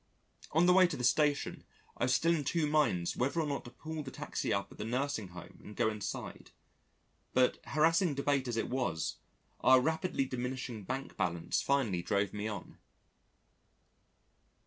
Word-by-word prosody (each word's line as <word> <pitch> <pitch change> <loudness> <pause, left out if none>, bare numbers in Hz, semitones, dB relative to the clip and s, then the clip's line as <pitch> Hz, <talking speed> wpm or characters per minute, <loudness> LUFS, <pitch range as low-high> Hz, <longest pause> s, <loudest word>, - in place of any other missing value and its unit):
On 165 +3 +4
the 180 - +6
way 185 0 +7
to 170 - -4
the 125 - -4
Station 145 +3 +2 0.3
I - - 0
was 130 - +2
still 165 +4 +3
in 155 -3 0
two 160 +3 +1
minds 150 - +1
whether 135 +7 0
or 160 - +1
not 140 -2 -2
to - - -8
pull 155 +5 -6
the 140 - -7
taxi - - -3
up 100 0 -1
at - - -14
the - - -2
Nursing 125 -2 -1
Home 90 -1 -11
and 105 - -10
go 115 -2 +2
inside, 105 -1 -6 0.9
but 125 0 +3
harassing 165 +1 +3
debate 140 -1 +1
as 120 -2 -2
it 115 - 0
was, 120 - -2 0.4
our 130 0 +6
rapidly 160 +1 0
diminishing 125 -4 -4
bank 135 +4 -5
balance 85 -2 0
finally 120 -11 +1
drove 100 +3 0
me 105 +1 -3
on. 105 -4 -7
130 Hz, 170 wpm, -33 LUFS, 110-150 Hz, 0.9 s, way